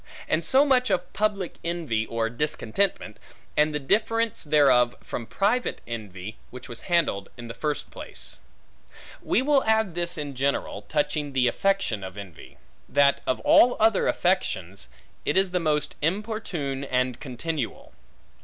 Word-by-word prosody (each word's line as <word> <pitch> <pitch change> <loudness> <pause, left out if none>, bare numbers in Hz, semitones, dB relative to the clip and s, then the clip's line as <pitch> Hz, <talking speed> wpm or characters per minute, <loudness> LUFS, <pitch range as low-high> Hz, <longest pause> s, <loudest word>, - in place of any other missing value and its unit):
And 160 +2 +1
so 265 - +4
much 255 -3 +3
of 190 -2 -1
public 205 -4 -1
envy 160 -11 -1
or 115 -1 -1
discontentment, 120 - -1 0.4
and 150 +1 +3
the 150 - -1
difference 220 +10 +1
thereof 135 -5 +4
from 115 - -5
private 220 +6 0
envy, 105 -3 -7
which 125 0 -10
was 120 -2 -8
handled 165 - +1
in 120 -1 -8
the 115 - -6
first 150 +2 -3
place. - - -8 0.8
We 255 - +1
will 280 -1 +3
add 220 -4 +2
this 175 0 -2
in 145 -2 -4
general, 135 -6 -1
touching 150 -1 -1
the 130 -2 +3
affection 195 - 0
of 95 +1 -8
envy; 95 -6 -11 0.3
that 140 -1 +4
of 130 - 0
all 245 - +6
other 220 -2 +3
affections, 100 - 0 0.4
it - - 0
is 190 -1 +3
the 180 - +1
most 150 -3 0
importune 170 -6 -2
and 125 -2 0
continual. 140 0 -5
150 Hz, 145 wpm, -26 LUFS, 120-195 Hz, 0.8 s, all